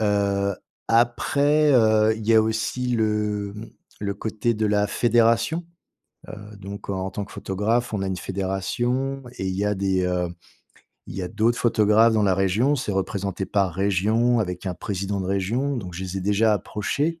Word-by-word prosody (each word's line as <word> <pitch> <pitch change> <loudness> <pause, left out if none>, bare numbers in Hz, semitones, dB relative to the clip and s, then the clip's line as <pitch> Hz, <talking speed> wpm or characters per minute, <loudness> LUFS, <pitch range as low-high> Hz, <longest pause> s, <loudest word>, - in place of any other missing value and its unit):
Heu, 100 -1 +1 0.3
après, 140 +6 +3
heu, 110 -3 +4
il 110 -1 -7
y 115 - +4
a 110 - +7
aussi 110 +3 -2
le 105 -3 0
mmh, 105 +2 -9 0.3
le 100 -1 -2
côté 110 +2 -1
de 110 0 -1
la 105 0 +2
fédération. 120 +10 +2 0.6
Heu, - - -9 0.2
donc, 100 +1 -9
en 95 -1 -2
tant 100 +3 -4
que 100 - -12
photographe, 110 +5 -1
on 100 - -1
a 95 - -1
une 95 -1 -2
fédération 120 +9 -2
et 95 - -3
il 95 - -2
y 100 - -1
a 105 0 0
des, 95 -1 0
heu, 90 -1 0 0.8
il - - -9
y 95 - -3
a 90 - -3
d'autres 115 +3 +1
photographes 110 0 +4
dans 110 - +2
la 95 -2 +3
région. 100 +10 +2
C'est 120 -6 -3
représenté 95 0 -2
par 100 -3 +1
région 105 +6 +2
avec 90 -1 -4
un 90 - -2
président 100 +1 -3
de - - -4
région, 110 +9 -1
donc 90 -5 -7
je 90 - -5
les 95 +1 -4
ai - - -5
déjà 105 +3 +2
approchés. 140 - -2
105 Hz, 185 wpm, -24 LUFS, 95-115 Hz, 0.8 s, a